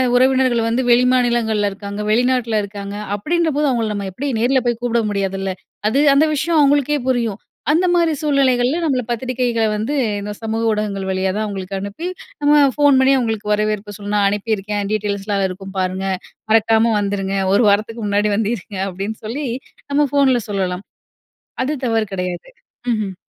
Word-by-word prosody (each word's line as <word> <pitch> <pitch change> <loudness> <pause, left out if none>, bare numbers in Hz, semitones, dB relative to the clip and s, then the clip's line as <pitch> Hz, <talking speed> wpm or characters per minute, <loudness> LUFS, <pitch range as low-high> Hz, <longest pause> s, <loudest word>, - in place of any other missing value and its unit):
உறவினர்கள் 255 -2 +3
வந்து 235 +3 +1
வெளிமாநிலங்கள்ல 240 -4 +3
இருக்காங்க, 200 +1 -7
வெளிநாட்ல 240 0 +2
இருக்காங்க, 200 0 -7 0.2
அப்பிடின்றபோது 300 - 0
அவுங்கள 235 -4 0
நம்ம 200 -1 -3
எப்பிடி 250 +10 -5
நேர்ல 255 +4 +3
போய் 240 -1 +1
கூப்பிட 235 -1 +1
முடியாதுல்ல. 195 -1 -2 0.4
அது 265 +6 +2
அந்த 285 +3 +5
விஷயம் 320 +3 +1
அவுங்களுக்கே 285 +1 +3
புரியும். 235 -5 0 0.3
அந்தமாரி 345 0 +3
சூழ்நிலைகள்ல் 275 +1 +2
நம்மள 265 -5 +1
பத்திரிக்கைகள 245 -1 -1
வந்து 220 +7 -2 0.3
இந்த 205 +1 -5
சமூக 225 0 -2
ஊடகங்கள் 205 -2 -2
வழியாதான் 190 +3 -1
அவுங்களுக்கு 195 -2 -5
அனுப்பி, 200 - -5 0.3
நம்ம 290 0 +4 0.2
ஃபோன் 290 -2 +5
பண்ணி 265 +1 +5
அவுங்களுக்கு 220 -3 -1
வரவேற்பு 210 -1 -1
சொல்லணும். 205 0 -4
"நான் 200 - +3
அனுப்பியிருக்கேன், 205 -1 -2
டீட்டெயில்ஸ்லாம் 205 -1 -1
அதுல 190 -1 +1
இருக்கும் 195 +1 -9
பாருங்க. 185 +1 -1 0.5
மறக்காம 225 +1 +4
வந்துருங்க. 195 -1 -2 0.2
ஒரு 205 - +4
வாரத்துக்கு 215 +3 0
முன்னாடி 205 +1 +1
வந்து 215 +1 0
இருங்க." 195 +1 -10
அப்பிடின்னு 195 +4 -5
சொல்லி, 270 +7 -3 0.5
நம்ம 290 +1 +3
ஃபோன்ல 270 -4 +3
சொல்லலாம். 190 -1 -2 0.8
அது 280 - -1
தவறு 225 -1 +1
கிடையாது. 180 - -4 0.4
ம்ஹ்ம். 210 -4 -2
220 Hz, 150 wpm, -19 LUFS, 200-255 Hz, 0.8 s, அந்த